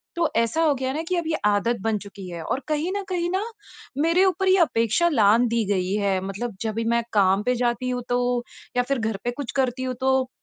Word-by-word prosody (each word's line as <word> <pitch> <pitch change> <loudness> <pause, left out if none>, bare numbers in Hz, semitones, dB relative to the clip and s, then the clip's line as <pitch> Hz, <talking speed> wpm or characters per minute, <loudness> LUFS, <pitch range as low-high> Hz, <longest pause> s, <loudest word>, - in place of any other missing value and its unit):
तो 340 -2 +2
ऐसा 230 +8 +1
हो 300 -3 +4
गया 260 0 -1
ना 310 - -2
कि 365 - +1
अब 335 -2 -2
ये 320 - 0
आदत 210 +3 +2
बन 220 0 0
चुकी 200 -2 -10
है। 170 -2 -6
और 260 - -2
कहीं 310 +4 -1
न 400 - -3
कहीं 345 -1 -1
न 390 - 0 0.6
मेरे 335 +4 +4
ऊपर 385 0 +1
ही 375 +1 +5
अपेक्षा 230 +5 +1
लाँघ 225 -4 +4
दी 230 -1 +1
गई 185 0 -1
है 195 -2 +1
मतलब 200 +3 -4
जब 220 -1 -2
भी 230 - -1
मैं 235 - +2
काम 195 0 +3
पे 250 +2 +1
जाती 240 +1 0
हूँ 250 -1 -2
तो 245 0 +2 0.6
या 245 - +4
फिर 275 -3 +1
घर 220 -3 -2
पे 245 - -1
कुछ 270 0 -6
करती 255 0 -2
हूँ 255 -1 -2
तो, 265 -1 +2
245 Hz, 240 wpm, -24 LUFS, 215-305 Hz, 0.6 s, ही